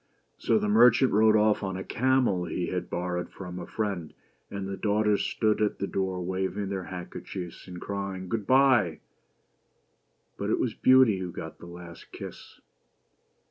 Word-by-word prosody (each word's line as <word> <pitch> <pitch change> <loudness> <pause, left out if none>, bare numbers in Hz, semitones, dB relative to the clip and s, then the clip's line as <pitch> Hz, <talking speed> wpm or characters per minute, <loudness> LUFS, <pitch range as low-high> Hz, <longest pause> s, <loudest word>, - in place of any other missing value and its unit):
So - - +2
the 210 0 0
merchant 130 - +5
rode 110 +1 +5
off 105 0 +3
on 95 -2 -3
a 95 - -5
camel 125 -8 +1
he 85 +1 -3
had 90 - -3
borrowed 90 0 -3
from 90 -2 -8
a - - -7
friend, 100 -7 -3 0.3
and 100 -1 -5
the 95 - -4
daughters 105 0 +1
stood 110 -1 0
at 105 - +1
the - - -2
door 95 -2 -2
waving 95 +2 -2
their 95 -2 -3
handker 90 -1 -7
chiefs 90 -1 -8
and 90 -1 -8
crying 100 -1 -4
"good 105 +1 -3
bye!" 130 - +4 1.4
But - - -2
it - - +1
was - - 0
Beauty 130 -6 +5
who 90 -2 -4
got 80 -1 -8
the 85 - -11
last 85 -1 -11
kiss. - - -10
95 Hz, 170 wpm, -27 LUFS, 90-110 Hz, 1.4 s, merchant